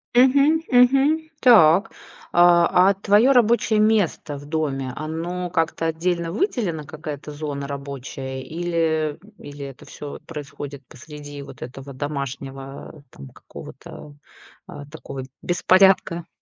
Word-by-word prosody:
Мгм 275 +5 +5
мгм. 275 +6 +4
Так. 200 -4 +6 0.4
А, 175 +2 +5
а 200 - +3
твое 205 +6 +3
рабочее 235 -3 +3
место 210 -9 +1
в 145 - -11
доме, 145 -4 -2
оно 170 +4 -4
как-то 165 -1 -1
отдельно 170 +1 -1
выделено, 205 - -1
какая-то 150 0 -7
зона 145 -2 -5
рабочая 135 -1 -6
или, 160 -1 -1
м, 210 - -18
или 145 -1 -9
это 135 -2 -11
всё 145 - -9
вот - - -11
происходит 145 -2 -8
посреди 145 +1 -10
вот 140 - -12
этого 135 +2 -9
домашнего, 135 -1 -5 0.3
а, 155 - -14
там, 70 -1 -12
какого-то, 145 - -12 0.5
а 145 - -9
такого 140 -3 -8 0.2
беспорядка? 180 -1 +3
160 Hz, 125 wpm, -22 LUFS, 145-195 Hz, 0.5 s, Так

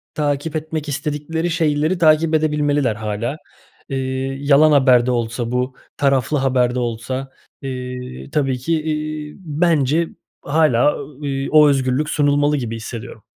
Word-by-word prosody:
takip 145 +1 -1
etmek 155 -1 -3
istedikleri 150 +3 -2
şeyleri 160 +1 +1
takip 160 -1 +4
edebilmeliler 145 -5 +1
hâlâ. 110 +6 -3 0.5
İii, 135 +1 -3
yalan 150 +2 +6
haber 130 -4 +5
de 125 - +1
olsa 115 0 -2
bu, 125 +1 -1 0.2
taraflı 140 +1 +1
haber 130 -2 +1
de - - 0
olsa, 125 +3 -4 0.3
iii, 125 -1 -6
tabii 135 -4 0
ki, 155 +5 -1
iii, 155 -1 -4
bence 160 -2 +1 0.3
hâlâ, 145 -3 +3
ııı, 145 +1 -9
iii, 135 0 -2
o 150 -1 +7
özgürlük 135 +2 +1
sunulmalı 145 0 +2
gibi 115 -4 -3
hissediyorum. 115 0 -8
140 Hz, 135 wpm, -20 LUFS, 125-155 Hz, 0.5 s, o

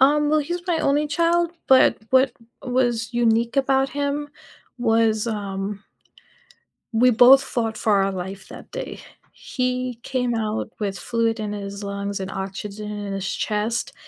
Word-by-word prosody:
Um, 295 +2 +4
well, 310 - +4
he's 345 +4 -3
my 340 -2 +1
only 295 +2 +2
child, 335 +3 +2 0.2
but 260 -1 +5
what 260 -1 +4 0.3
was 245 -3 0
unique 235 +1 +1
about 270 0 +2
him 285 +1 -2 0.5
was, 225 -1 +2
um 200 -2 -4 1.1
we 240 +2 +4
both 250 +3 +7
fought 225 -4 -2
for 200 -3 +2
our 195 - 0
life 190 +1 -6
that - - -11
day. - - -6 0.3
He 250 -2 -3
came 250 -3 -1
out 215 -1 -2
with 200 -2 -2
fluid 230 +1 0
in 210 -1 -3
his 200 0 -6
lungs 200 0 -4
and 190 - -4
oxygen 200 +2 -5
in 205 -1 -5
his 195 -1 -3
chest, 215 +3 -2
230 Hz, 150 wpm, -23 LUFS, 205-265 Hz, 1.1 s, both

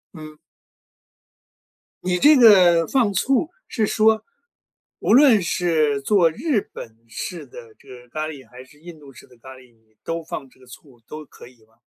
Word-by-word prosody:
嗯。 155 -1 -12 1.7
你 180 0 -1
这 300 -1 +5
个 180 -8 +5
放 235 -7 0
醋 265 - 0 0.2
是 215 -4 -2
说， 220 0 +1 0.8
无 - - 0
论 250 -6 +5
是 160 -5 -1
做 170 +2 +2
日 245 - -2
本 110 -1 -12
式 165 - -8
的 465 -1 -14
这 - - -21
个 125 -1 -14
咖 155 +2 -5
喱 140 -6 -11
还 125 +1 -14
是 145 +3 -23
印 165 -1 -13
度 140 -2 -16
式 - - -17
的 125 - -22
咖 130 +3 -14
喱， 125 -2 -20
你 110 -1 -36
都 165 0 -5
放 140 -3 -8
这 130 - -28
个 130 - -21
醋， 125 -1 -17
都 155 0 -10
可 120 - -16
以 125 -3 -22
吗？ 110 0 -34
160 Hz, 190 characters per minute, -20 LUFS, 130-210 Hz, 1.7 s, 这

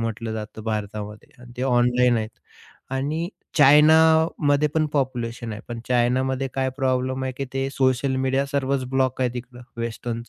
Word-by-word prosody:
म्हटलं 115 0 -3
जातं 110 0 -7
भारतामध्ये 105 -1 -5
आणि 120 0 -13
ते 125 - -3
ऑनलाईन 125 -1 +3
आहेत. 110 0 -3 0.6
आणि 150 +6 -2 0.3
चायनामध्ये 150 0 +5
पण 155 -1 +2
पॉप्युलेशन 120 -4 -2
आहे, 105 - -7
पण 120 -1 -5
चायनामध्ये 130 +2 +1
काय 130 -1 0
प्रॉब्लेम 130 -1 0
आहे, 130 - -3
की 140 - -3
ते 135 0 -1
सोशल 130 0 +1
मीडिया 135 +1 +1
सर्वच 140 -1 -1
ब्लॉक 130 -1 0
आहे 125 -2 +1
तिकड, 125 0 -8 0.2
वेस्टर्नच 115 0 -5
130 Hz, 150 wpm, -23 LUFS, 120-135 Hz, 0.6 s, चायनामध्ये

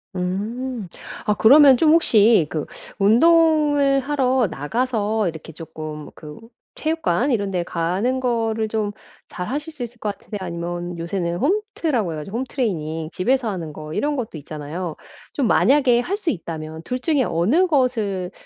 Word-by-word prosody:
음. 210 +5 -3 0.4
아 210 - +3
그러면 270 +4 +7
좀 310 +2 +4
혹시 220 - +5
그 155 -2 -3 0.3
운동을 290 +4 +4
하러 265 -3 +1
나가서 220 - -1
이렇게 160 -1 -9
쪼끔 155 -2 -8
그 150 +2 -11 0.3
체육관 315 -4 0
이런 200 -4 0
데 180 -2 0
가는 185 +10 -1
거를 225 -3 -1
좀 210 -1 -1 0.4
잘하실 285 - -5
수 275 -5 -6
있을 240 0 -9
것 205 -2 -3
같으세요, 210 - -7
아니면 175 0 -5
요새는 170 0 -2
홈트라고 305 - -1
해 - - -5
가지고 195 +9 -5
홈 260 - -1
트레이닝 160 - -3
집에서 240 +4 0
하는 170 -6 -5
거 155 +1 -8
이런 295 0 0
것도 225 - -4
있잖아요. 155 +3 -6 0.4
좀 275 - 0
만약에 255 -1 +4
할 370 +11 -1
수 350 - -1
있다면 160 -2 -6
2 250 - -3
중에 290 -1 +1
어느 240 - +2
것을 225 - 0
220 Hz, 300 characters per minute, -21 LUFS, 170-265 Hz, 0.4 s, 그러면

